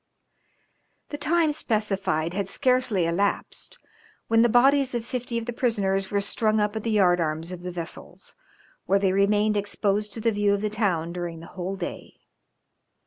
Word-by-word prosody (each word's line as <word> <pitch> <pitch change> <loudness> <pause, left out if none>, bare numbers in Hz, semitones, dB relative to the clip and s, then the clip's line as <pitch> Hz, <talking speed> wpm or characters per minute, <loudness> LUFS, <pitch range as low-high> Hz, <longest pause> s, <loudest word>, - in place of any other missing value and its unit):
The 290 - -5
time 315 +2 +2
specified 195 - -1
had 200 0 -2
scarcely 250 -7 +1
elapsed 195 +5 -2 0.5
when 225 0 +5
the 240 - +4
bodies 265 +2 +4
of 235 -1 -3
fifty 245 -1 -4
of 230 - -3
the 240 - -4
prisoners 195 -6 0
were 200 -1 0
strung 215 +2 +1
up 210 +1 0
at 220 - -2
the 230 - -3
yard 185 -5 +3
arms 160 +2 -2
of 180 -1 -7
the 180 - -5
vessels, 175 -2 -8 0.5
where 195 - +4
they 195 -1 +2
remained 210 +2 +2
exposed 205 0 -1
to 225 - -6
the 230 +1 +1
view 205 -1 +2
of 200 - -4
the 210 -1 -1
town 180 -6 0
during 175 -2 -5
the 165 - -10
whole 185 +1 -4
day. 180 -2 -7
205 Hz, 175 wpm, -25 LUFS, 185-230 Hz, 0.5 s, when